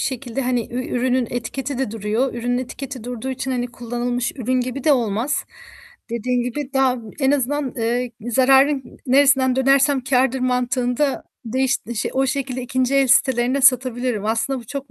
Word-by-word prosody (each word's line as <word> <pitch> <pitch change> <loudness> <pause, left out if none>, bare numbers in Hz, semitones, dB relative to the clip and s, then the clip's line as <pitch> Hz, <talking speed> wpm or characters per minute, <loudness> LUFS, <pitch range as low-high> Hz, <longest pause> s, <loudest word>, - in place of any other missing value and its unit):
şekilde 260 0 -3
hani 245 -2 0
ü 255 0 -2
ürünün 250 0 +1
etiketi 255 +3 -4
de 265 -6 -1
duruyor, 225 +4 -1
ürünün 245 +1 -1
etiketi 255 -1 -6
durduğu 245 +1 -5
için 265 +1 -4
hani 245 -1 -1
kullanılmış 245 +1 -3
ürün 255 0 0
gibi 255 +2 -4
de 305 - +5
olmaz. 235 +2 0 0.7
Dediğin 245 +1 -1
gibi 265 +3 -4
daha 265 -1 +3 0.2
en 270 0 +3
azından, 290 +1 +1 0.2
ııı, 240 +2 0 0.2
"Zararın 270 +3 +5
n - - -15
neresinden 265 -1 +4
dönersem 270 +1 +3
kârdır" 265 -1 +2
mantığında 250 +2 0 0.2
değiş 260 +3 +1 0.4
o 265 +1 +1
şekilde 260 -1 -2
ikinci 255 +2 0
el 275 -1 +4
sitelerine 255 +1 +3
satabilirim. 250 -4 +2
Aslında 230 +5 0
bu 230 - -15
çok 275 0 -6
255 Hz, 155 wpm, -21 LUFS, 245-270 Hz, 0.7 s, de